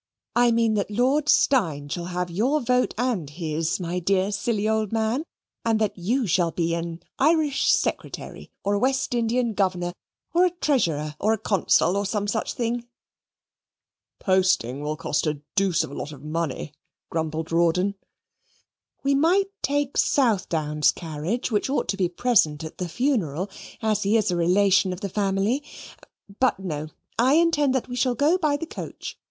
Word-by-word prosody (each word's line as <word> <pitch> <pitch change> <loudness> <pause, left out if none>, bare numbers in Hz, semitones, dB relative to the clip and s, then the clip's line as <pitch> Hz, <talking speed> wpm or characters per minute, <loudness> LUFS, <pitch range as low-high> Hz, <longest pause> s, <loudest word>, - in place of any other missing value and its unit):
I 240 0 +5
mean 230 -1 +2
that 205 -1 -1
Lord 265 +7 +1
Steyne 160 - +3
shall 170 +4 -4
have 180 0 -3
your 250 - +1
vote 250 -1 +1
and 225 - -1
his, 160 +1 -2
my 175 0 -2
dear, 185 +1 +2
old 205 +2 -3
silly 215 0 -1 0.2
man; 225 +6 0 0.4
and 225 -1 +2
that 215 -2 0
you 230 +8 0
shall 175 -2 +2
be 165 0 -1
an 170 0 -4 0.2
Irish 300 0 +2
Secretary, - - -1
or 200 - +1
a 205 - +1
West 265 +2 0
Indian 235 0 +1
Governor: 180 -3 0 0.4
or 350 +2 +4
a 365 - +5
Treasurer, 175 - 0
or 215 +2 +2
a - - 0
Consul, 195 -3 +2
or 200 0 0
some 205 0 -1
such 220 +2 -1
thing." 240 0 -2 1.3
"Posting 185 - +1
will 150 +1 -2
cost 155 0 -1
a 150 -1 -3
dooce 195 -4 +2
of - - -7
a - - -9
lot 150 - -5
of 140 -2 -12
money," 155 -2 -3 0.4
grumbled 160 0 -2
Rawdon. 170 +4 +2 1.1
"We 280 0 +2
might 360 +8 +3
take 285 -1 -1
Southdown's 165 - +2
carriage, 170 - -3
which 210 +4 0
ought 280 - 0
to 195 - +1
be 185 -3 +1
present 170 -7 +2
at 160 - -8
the 180 -2 -3
funeral, 195 - -1 0.3
as 215 -2 +1
he 210 +3 +3
is 215 -3 +1
a - - 0
relation 185 +2 +3
of 180 - -8
the 200 - -3
family: 200 +6 0 0.8
but, 255 - +3
no 155 -5 -4 0.3
I 260 +4 +5
intend 300 -5 +3
that 260 - -1
we 245 - -5
shall 250 0 +1
go 305 +9 +3
by 300 -4 +1
the 330 - -5
coach. - - -7
200 Hz, 170 wpm, -24 LUFS, 170-250 Hz, 1.3 s, I